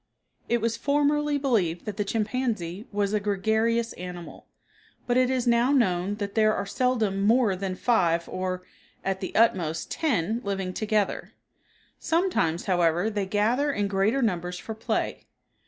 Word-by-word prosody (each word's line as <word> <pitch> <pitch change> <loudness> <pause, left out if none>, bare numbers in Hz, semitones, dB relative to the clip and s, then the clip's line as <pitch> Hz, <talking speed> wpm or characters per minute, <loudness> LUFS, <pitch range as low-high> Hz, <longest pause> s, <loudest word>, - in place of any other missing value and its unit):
It 235 -1 +2
was 230 0 0
formerly 290 +2 +1
believed 210 - 0
that 210 - -4
the 205 - -1
chimpanzee 215 -3 -2
was 205 0 0
a 210 - +2
gregarious 220 +3 0
animal, 175 -1 -9 0.6
but 245 - 0
it 255 0 +3
is 260 -1 0
now 240 +2 +3
known 195 -7 +2
that 200 -1 -4
there 215 -1 +3
are 200 - -2
seldom 220 -3 0
more 220 -1 +3
than 185 0 -3
five, 170 -7 +1
or, 185 0 -3 0.4
at 195 -1 -1
the 185 - -5
utmost, 170 -8 +2
ten 230 - 0
living 195 -2 -3
together. 215 -1 -1 0.7
Sometimes, 325 - 0
however, 175 +2 +2
they 205 -2 -2
gather 230 +9 +1
in 205 -6 -1
greater 200 +7 +1
numbers 180 -4 -1
for 220 - -6
play. 220 - -3
210 Hz, 150 wpm, -26 LUFS, 185-235 Hz, 0.7 s, it